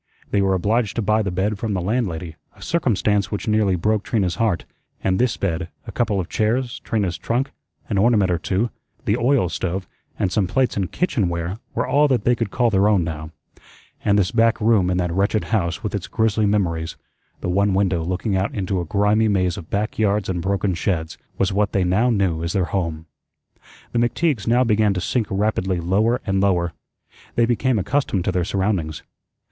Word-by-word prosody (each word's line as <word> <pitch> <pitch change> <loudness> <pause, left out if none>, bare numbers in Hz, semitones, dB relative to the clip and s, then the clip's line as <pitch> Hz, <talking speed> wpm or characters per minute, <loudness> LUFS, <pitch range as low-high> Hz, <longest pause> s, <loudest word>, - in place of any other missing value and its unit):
They 100 - +2
were 95 -1 +2
obliged 105 +3 0
to 115 - -1
buy 110 +2 +2
the 100 - -1
bed 95 +3 -1
from 110 -2 -2
the - - 0
landlady, 90 -5 -2 0.2
a - - -19
circumstance 105 - +1
which 105 +1 -4
nearly 105 -3 +2
broke 105 +4 +1
Trina's 95 -7 -1
heart; 110 -7 0 0.4
and 95 0 +1
this 125 -2 +1
bed, 85 -2 -2 0.2
a - - -7
couple 110 -5 0
of 90 - -3
chairs, 120 +3 0
Trina's 100 -6 -2
trunk, 125 +4 -1 0.4
an 100 - 0
ornament 105 -4 +3
or 85 - +1
two, 100 +7 -1 0.3
the 105 - +2
oil 125 -3 +2
stove, 90 +2 -3 0.3
and 95 - 0
some 100 -3 +1
plates 130 +6 +1
and 95 -3 -2
kitchen 130 - 0
ware 85 +4 -3 0.2
were - - 0
all 145 +3 +3
that 130 -6 +1
they 120 - +4
could 115 -3 -2
call 120 +2 +1
their 100 0 +3
own 100 -4 +3
now; 80 -1 -5 0.7
and 100 -1 +3
this 95 -3 +2
back 115 -1 +3
room 105 -5 +3
in 90 - +1
that 90 -2 -1
wretched 100 +3 +1
house 85 -7 -1
with - - -3
its - - -3
grisly 110 -1 +1
memories, 85 -6 0 0.5
the - - -3
one 100 +2 +2
window 95 -4 +1
looking 95 +4 -1
out 95 +2 0
into 95 -2 -1
a - - -4
grimy 105 +5 +2
maze 95 -4 +1
of 80 - -9
back 105 +2 -2
yards 105 -2 +1
and 90 -2 -2
broken 100 +1 0
sheds, 80 -2 -2 0.2
was 95 0 +1
what 105 +1 +1
they 95 - +2
now 95 +8 +2
knew 95 -8 +1
as 85 - -2
their 95 -4 +1
home. 85 -4 -3 0.9
The 120 - 0
McTeagues 120 - 0
now 120 +2 +4
began 105 -3 +2
to - - 0
sink 110 +4 -1
rapidly 95 -2 0
lower 105 +8 +1
and 95 -2 +1
lower. 90 -4 +1 0.6
They 115 - +4
became 125 +1 +1
accustomed 105 -2 0
to - - +1
their 90 -1 0
surroundings. 95 -5 -1
100 Hz, 200 wpm, -22 LUFS, 90-110 Hz, 0.9 s, they